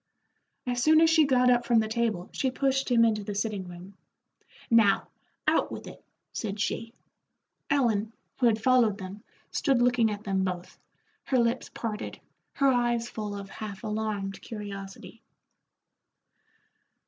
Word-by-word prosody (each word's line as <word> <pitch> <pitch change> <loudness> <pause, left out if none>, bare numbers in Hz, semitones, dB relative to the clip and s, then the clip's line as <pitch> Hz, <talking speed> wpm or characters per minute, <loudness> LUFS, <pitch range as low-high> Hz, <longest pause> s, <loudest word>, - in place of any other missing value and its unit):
As 245 -1 -1
soon 310 +3 +6
as 325 0 +5
she 320 -2 +5
got 250 -2 +4
up 245 -1 +3
from 235 - +3
the 220 -1 +3
table 220 -5 -1
she 265 - 0
pushed 270 +1 0
him 235 -2 +5
into 215 -2 +1
the 205 0 -5
sitting 205 -3 -2
room. 180 +2 -10 0.8
"Now, 220 -4 +4 0.4
out - - +2
with - - -7
it," - - -11 0.3
said 205 -2 -4
she. 230 +3 -2 0.7
Ellen, 225 -6 +2 0.3
who 250 - +4
had 220 -1 +2
followed 235 -4 +3
them, 195 +1 -8 0.3
stood 270 -3 +2
looking 245 -2 +3
at 210 0 -5
them 195 -2 0
both, 180 -1 -5 0.5
her 260 - +1
lips 235 +1 +1
parted, 220 -2 -5 0.3
her 275 -1 +3
eyes 240 -1 +1
full 210 -2 -4
of 200 -1 -8
half 205 -3 -7
alarmed 210 -2 -3
curiosity. 200 -3 -8
220 Hz, 150 wpm, -28 LUFS, 205-245 Hz, 0.8 s, soon